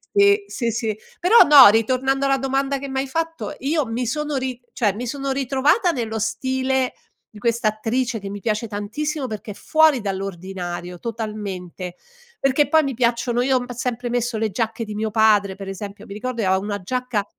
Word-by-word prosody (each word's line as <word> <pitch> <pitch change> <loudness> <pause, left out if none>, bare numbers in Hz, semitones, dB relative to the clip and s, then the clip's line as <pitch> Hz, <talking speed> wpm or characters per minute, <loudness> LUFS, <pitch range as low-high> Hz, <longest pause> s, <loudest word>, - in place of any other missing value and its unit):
Sì, 405 0 +5
sì, 235 -2 -2
sì, 220 -2 -2 0.2
però 375 +7 +6
no, 290 -3 +10
ritornando 260 +5 +1
alla 275 0 +3
domanda 270 +1 0
che 280 - -6
m'hai 265 0 -2
fatto, 325 +2 -3
io 295 +1 0
mi 235 +2 -2
sono 300 +4 -2
ri 255 -2 -3
cioè, 210 -4 +1
mi 235 +4 -5
sono 275 +1 -3
ritrovata 280 - +2
nello 225 -6 -3
stile 260 +3 0 0.4
di 210 - -11
questa 230 0 +1
attrice, 225 +2 -2
che 200 - -7
mi 205 +1 -6
piace 215 +2 -1
tantissimo, 260 +9 -3
perché 215 -3 -6
è - - -6
fuori 315 -2 +3
dall'ordinario 180 -3 -5
totalmente, 200 -6 -5 0.4
perché 275 +2 +2
poi 315 -1 +5
mi 275 - -2
piacciono 240 0 +1
io 260 +1 +3
ho 245 - -3
sempre 245 0 -3
messo 240 -1 -1
le 220 -1 -1
giacche 225 +2 -2
di 215 - -6
mio 215 +1 -2
padre, 210 -3 +3
per 195 0 -8
esempio 200 +1 -7
mi 200 - -9
ricordo 235 +3 -4
che 200 - 0
aveva 190 0 +3
una 205 0 -3
giacca 250 -2 -2
235 Hz, 185 wpm, -22 LUFS, 210-270 Hz, 0.4 s, no